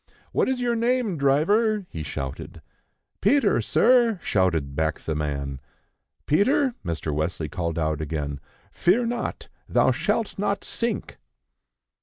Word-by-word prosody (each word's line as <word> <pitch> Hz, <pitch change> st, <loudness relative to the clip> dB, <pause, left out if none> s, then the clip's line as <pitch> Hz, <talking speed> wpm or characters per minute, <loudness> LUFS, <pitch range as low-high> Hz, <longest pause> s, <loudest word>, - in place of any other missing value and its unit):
"What -, -, +1 dB
is 260 Hz, -1 st, 0 dB
your 240 Hz, -1 st, +1 dB
name, 235 Hz, -3 st, +1 dB
driver?" 195 Hz, +10 st, +2 dB
he 80 Hz, -, -5 dB
shouted. 70 Hz, -3 st, -6 dB, 0.6 s
"Peter, 215 Hz, -, +3 dB
sir," 230 Hz, -, +4 dB
shouted 85 Hz, -8 st, +1 dB
back 80 Hz, 0 st, 0 dB
the 80 Hz, -, -3 dB
man. 70 Hz, -3 st, -3 dB, 0.7 s
"Peter," 250 Hz, -, +3 dB
Mr. 80 Hz, -4 st, -3 dB
Wesley 80 Hz, +1 st, -2 dB
called 85 Hz, +1 st, -3 dB
out 80 Hz, -2 st, 0 dB
again, 75 Hz, -2 st, -3 dB, 0.3 s
"fear 210 Hz, +8 st, +2 dB
not; 235 Hz, +1 st, -3 dB, 0.2 s
thou -, -, +4 dB
shalt 225 Hz, -3 st, -1 dB
not 200 Hz, 0 st, 0 dB
sink." 230 Hz, -, -3 dB
140 Hz, 125 wpm, -25 LUFS, -, 0.7 s, sir